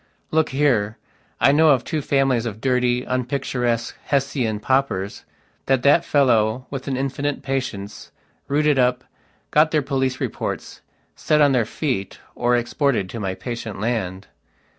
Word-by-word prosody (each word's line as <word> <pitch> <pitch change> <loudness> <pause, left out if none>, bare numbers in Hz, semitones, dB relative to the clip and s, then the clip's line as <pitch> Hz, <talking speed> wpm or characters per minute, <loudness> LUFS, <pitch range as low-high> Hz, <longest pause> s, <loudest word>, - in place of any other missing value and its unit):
Look 160 0 +2
here, 120 -7 +1 0.4
I - - +5
know 155 +2 +5
of 135 -5 +4
two 155 - -2
families 135 -4 +1
of 110 -1 -6
dirty, 125 -1 +1
unpicturesque, 125 -2 -1
Hessian 135 -6 0
paupers 105 -5 -1 0.4
that 130 -2 +2
that 145 +4 +5
fellow, 125 -3 +2
with 135 -1 -5
an 135 -2 -1
infinite 140 +2 -2
patience, 115 -7 -4 0.4
rooted 145 0 +2
up, 125 0 +2 0.5
got 155 +1 +5
their 150 -2 +1
police 130 -2 -1
reports, - - -4 0.3
set 150 - +1
on 145 -2 +5
their 125 -4 +2
feet, 115 -4 -3 0.2
or 120 0 +1
exported 120 - 0
to 115 - -5
my 95 -2 -3
patient 115 -4 -6
land. 95 -4 -2
130 Hz, 140 wpm, -22 LUFS, 115-140 Hz, 0.5 s, I